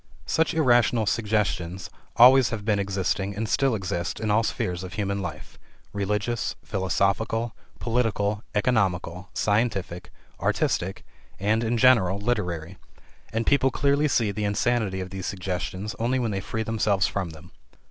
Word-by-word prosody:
Such 160 +1 +1
irrational 120 -6 +3
"suggestions" 100 -4 -1 0.2
always 125 +1 +7
have 105 -3 -5
been 105 -2 +2
existing, 100 0 -1
and 110 +2 -2
still 135 +1 +2
exist, 95 -3 -3
in 110 -1 -1
all 105 +2 +4
spheres 90 -5 -2
of 90 -1 -7
human 100 -1 -2
life 95 - -7 0.3
religious, 105 +3 -1
philosophical, 105 +3 0 0.2
political, 110 -3 0
economical, 95 -5 0
scientific, 105 -5 0 0.3
artistic, 95 +2 -1 0.3
and, 110 +3 +1
in 115 +1 0
general, 110 -7 +5
literary 95 -6 -2 0.5
and 115 +1 -1
people 135 -2 +3
clearly 140 +3 +2
see 115 -7 +1
the 105 +1 -3
insanity 105 -1 0
of 90 0 -7
these 95 -2 -5
suggestions 95 +2 -4
only 120 +3 +1
when 120 -4 -1
they 95 -1 -2
free 110 +3 -3
themselves 105 -3 +1
from 95 -4 -2
them. 80 +2 -13
105 Hz, 140 wpm, -25 LUFS, 95-115 Hz, 0.5 s, always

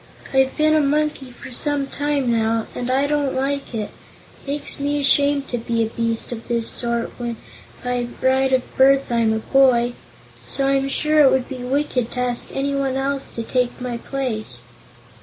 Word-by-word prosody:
I've 265 0 +2
been 310 0 +3
a 310 - +4
monkey 295 -2 0
for 250 +1 -11
some 285 +2 0
time, 285 -2 -1
now, 225 0 +1
and 245 0 -4
I 265 +2 +2
don't 290 -2 0
like 275 -1 -2
it. 215 -2 -3 0.4
It - - -22
makes 285 +1 0
me 290 +1 0
ashamed 280 0 +3
to 245 - -2
be 230 0 0
a 220 - -2
beast 230 0 -1
of 230 -1 -7
this 235 -1 +1
sort 235 -1 -2
when 235 -1 -4 0.5
by 245 -1 -1
right 265 0 +2
of 260 -1 +3
birth 270 0 +4
I'm 230 -2 +2
a 220 - +1
boy; 245 0 +3 0.5
so 275 - -1
I'm 275 0 +1
sure 305 +2 +2
it 285 -3 +7
would 260 -1 +1
be 265 - -6
wicked 255 -2 -1
to 250 - -4
ask 245 -1 -1
anyone 275 -1 -1
else 275 +1 -2
to 230 - -3
take 250 +1 -1
my 250 -1 -4
place." 245 -4 -3
265 Hz, 185 wpm, -21 LUFS, 240-280 Hz, 0.5 s, it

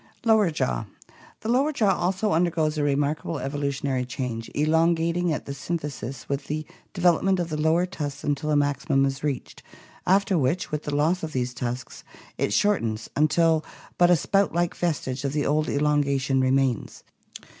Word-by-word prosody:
Lower 220 -4 +5
Jaw. 65 - -1 0.3
— - - -24
The 220 - -4
lower 270 +6 +3
jaw 215 -9 +2
also 190 +4 0
undergoes 160 -2 +1
a 150 - -1
remarkable 145 +3 0
evolu 140 +1 -2
tionary 135 -2 -2
change, 125 -3 -4
elongating 165 +3 +2
at 150 - -3
the - - -6
symphysis 140 -3 -5
with 140 0 -3
the 155 +1 -3 0.3
development 180 +1 +2
of 170 -1 -2
the 155 -1 -2
lower 160 +3 +3
tusks 145 -6 -5
until 145 +1 -1
a 150 - +2
maximum 140 -1 +2
is 135 +1 -3
reached, 145 -4 -3 0.5
after 195 -1 +3
which, 140 +7 0
with 150 0 -3
the 145 - -2
loss 160 +5 +2
of 155 -1 -5
these 125 -1 -1
tusks, 125 0 -5 0.4
it - - 0
shortens 115 - 0
until 160 +1 +3 0.4
but 175 0 +6
a 175 - +7
spout 195 +2 +1
like 175 0 +1
vestige 145 -6 -2
of 140 -1 -2
the 150 -1 0
old 155 +1 +1
elongation 140 -2 +1
remains. 130 -2 0
150 Hz, 170 wpm, -25 LUFS, 135-170 Hz, 0.5 s, a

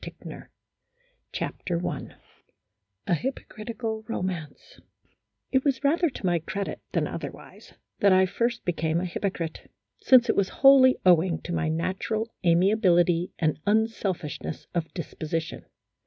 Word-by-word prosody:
233 - - -10 0.9
A - - -1
HYPOCRITICAL 175 -1 -4 0.3
ROMANCE - - -19 0.9
A - - +1
HYPOCRITICAL 225 - -4
ROMANCE 180 -8 -5 0.7
IT 265 -1 +2
was 280 -1 0
rather 330 +4 +3
to 250 - -8
my 175 -2 +2
credit 195 +5 -5
than - - +1
otherwise, - - -9 0.2
that 200 - +5
I 185 0 +5
first 235 +5 -2
became 165 -2 0
a 180 - -2
hypocrite, 175 -2 -4 0.3
since 255 -2 +6
it - - +2
was 200 -2 +1 0.2
wholly 265 -1 +8
owing 175 -1 +4
to 175 - -5
my 165 -2 0
natural 190 +7 -2
amiability 175 -1 +3
and 155 -2 0
unselfishness 205 -8 -1
of 170 -2 -2
disposition. 160 -1 -4
185 Hz, 125 wpm, -26 LUFS, 170-225 Hz, 0.9 s, wholly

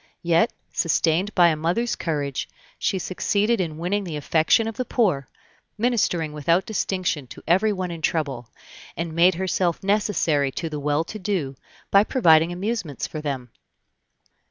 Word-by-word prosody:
Yet, 170 +5 +3 0.2
sustained 170 +4 +1
by 175 -2 +6
a 160 - +1
mother's 175 +10 0
courage, 145 -5 -3 0.3
she 195 - 0
succeeded 200 +4 0
in 160 -4 -4
winning 190 +5 -1
the 165 -5 -5
affection 160 +9 +2
of 225 - -4
the 255 - -2
poor, 185 - 0 0.5
ministering 210 -9 0
without 165 +5 +1
distinction 185 - -2
to - - -12
everyone 185 +1 +1
in 165 -1 -7
trouble; 140 -8 -2 0.5
and 170 -1 -3
made 170 +2 +4
herself 185 -1 -1
necessary 175 -9 +1
to 165 - -4
the 150 - -3
well 145 +2 0
to 215 +6 -8
do, 180 -9 -2 0.4
by 200 +1 +6
providing 165 -9 +4
amusements 185 - -3
for 155 - -6
them. 130 -5 -4
170 Hz, 150 wpm, -23 LUFS, 155-200 Hz, 0.5 s, by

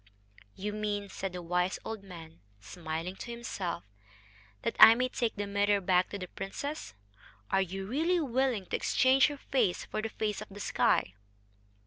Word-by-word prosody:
"You 205 +2 -4
mean," 205 -1 -2
said 195 0 -4
the 180 -1 -6
wise 180 +2 0
old 220 -2 -5
man, 165 -4 -11 0.2
smiling 165 - -5
to - - -8
himself, 205 -8 -4 0.8
"that - - -1
I 225 - +11
may 255 +1 0
take 235 -3 -1
the 205 - -2
mirror 200 0 +2
back 185 -1 +2
to 200 - -5
the 185 -2 -6
princess.... 195 - -6 0.6
Are 195 - +4
you 190 +1 -4
really 320 - +1
willing 260 - 0
to - - -2
exchange 260 +1 +4
her 290 -1 -5
face 240 -10 0
for 215 - -3
the 225 - -3
face 215 -2 -2
of 215 - -8
the 200 +1 -10
sky?" 95 - +1
205 Hz, 170 wpm, -31 LUFS, 180-235 Hz, 0.8 s, I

